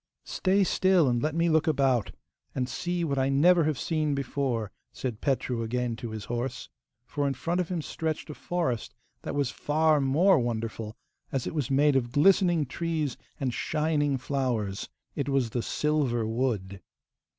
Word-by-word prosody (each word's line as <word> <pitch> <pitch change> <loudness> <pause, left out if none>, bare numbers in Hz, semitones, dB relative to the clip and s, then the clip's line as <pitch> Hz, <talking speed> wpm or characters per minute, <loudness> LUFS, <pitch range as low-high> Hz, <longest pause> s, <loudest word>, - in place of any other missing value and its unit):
'Stay 195 +1 +1
still, 185 -4 +3
and 120 -1 +1
let 155 +1 -1
me 170 +1 +2
look 160 0 +3
about, 135 -7 +2 0.5
and 125 -1 0
see 175 +6 -2
what 140 -4 0
I 135 +1 +2
never 165 +4 +5
have 155 -3 0
seen 155 -3 0
before,' 130 -5 -2 0.2
said 120 -4 -5
Petru 130 -4 0
again 120 +1 -1
to 115 - -6
his 110 -2 -6
horse. 120 +2 -4 0.4
For 145 +2 -1
in 135 - -1
front 170 +7 -1
of 175 - -4
him 175 -4 -2
stretched 160 0 -3
a - - -6
forest 145 -10 -2 0.3
that - - -5
was 140 -2 0
far 155 0 +2
more 150 +7 +4
wonderful, 115 -2 -3 0.3
as 135 -3 -1
it - - -4
was 150 -5 -1
made 140 +1 +4
of 120 -3 +1
glistening 175 0 +4
trees 155 0 -2 0.2
and 130 -4 -1
shining 150 -2 0
flowers. 125 -7 -2 0.3
It 140 -1 -2
was 135 -4 +1
the 120 - -1
silver 140 -5 0
wood. 110 -5 -2
140 Hz, 170 wpm, -28 LUFS, 120-155 Hz, 0.5 s, never